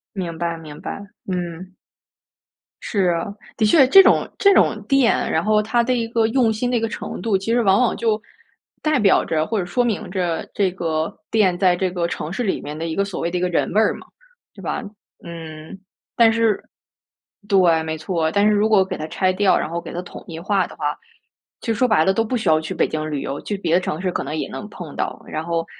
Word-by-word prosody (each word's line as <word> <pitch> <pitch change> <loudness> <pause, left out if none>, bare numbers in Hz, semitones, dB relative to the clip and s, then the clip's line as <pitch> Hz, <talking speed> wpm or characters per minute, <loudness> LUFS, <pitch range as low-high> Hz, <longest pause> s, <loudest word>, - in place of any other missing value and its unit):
明 170 -4 -4
白， 170 0 -2
明 155 -2 -11
白， - - -5 0.3
嗯。 180 0 -5 1.1
是 195 -4 0
啊， 165 0 -2 0.3
的 220 - +2
确 260 +5 +6
这 390 +8 +9
种 - - +3
这 400 0 +5
种 215 - +3
店， 275 -4 +3
然 - - +1
后 215 0 +3
它 235 +3 +1
的 255 +2 +1
一 230 -2 -1
个 230 -1 +2
用 230 -1 +2
心 245 +3 -1
的 245 - +2
一 - - +1
个 225 - -1
程 - - -6
度， 215 -4 +1
其 195 +4 -3
实 240 - +3
往 195 -3 +4
往 245 - +2
就 220 -2 0 0.6
代 305 -3 +2
表 200 -2 +4
着， 155 -1 0
或 220 +2 -1
者 180 - -2
说 245 +7 0
明 230 -5 -2
着 180 -3 -2
这 195 -3 +1
个 160 -3 -2 0.2
店 195 -5 +2
在 180 -1 +3
这 185 0 -1
个 175 -1 -1
城 155 -2 -5
市 220 +7 -2
里 195 - -1
面 150 +1 -7
的 165 +1 -3
一 160 - -3
个 200 - +2
所 200 -1 -5
谓 170 - -1
的 180 - -2
一 - - -2
个 180 - +1
人 170 - 0
味 210 - +4
儿 - - +2
嘛， - - -13 0.5
对 - - -13
吧？ - - -3 0.4
嗯， 160 0 -9 0.4
但 230 -1 +6
是 225 -2 +1 0.8
对， 175 -5 +4
没 160 0 -3
错， 160 0 -1
但 200 +2 +2
是 215 - +4
如 210 +1 +2
果 205 -3 +5
给 185 -1 -5
它 155 - -4
拆 185 +3 0
掉， 195 0 +3
然 - - -2
后 170 +1 -3
给 - - -9
它 175 - -4
统 180 - -11
一 165 -1 -7
化 195 +1 +1
的 - - -12
话， 145 0 -1 0.7
其 - - -9
实 225 - +2
说 250 +3 +2
白 185 -8 +3
了 190 - +3
都 225 - +1
不 245 +3 -2
需 215 - -4
要 155 -1 +4
去 160 - -5
北 - - +1
京 155 0 -3
旅 145 -2 -2
游， 140 - -4
去 205 - -4
别 170 -4 -1
的 180 - +3
城 160 -2 -3
市 185 - 0
可 - - -2
能 155 - -4
也 155 - -3
能 210 - -7
碰 175 -7 -9
到。 - - -3
然 155 - -4
后 165 0 -2
190 Hz, 265 characters per minute, -21 LUFS, 165-220 Hz, 1.1 s, 这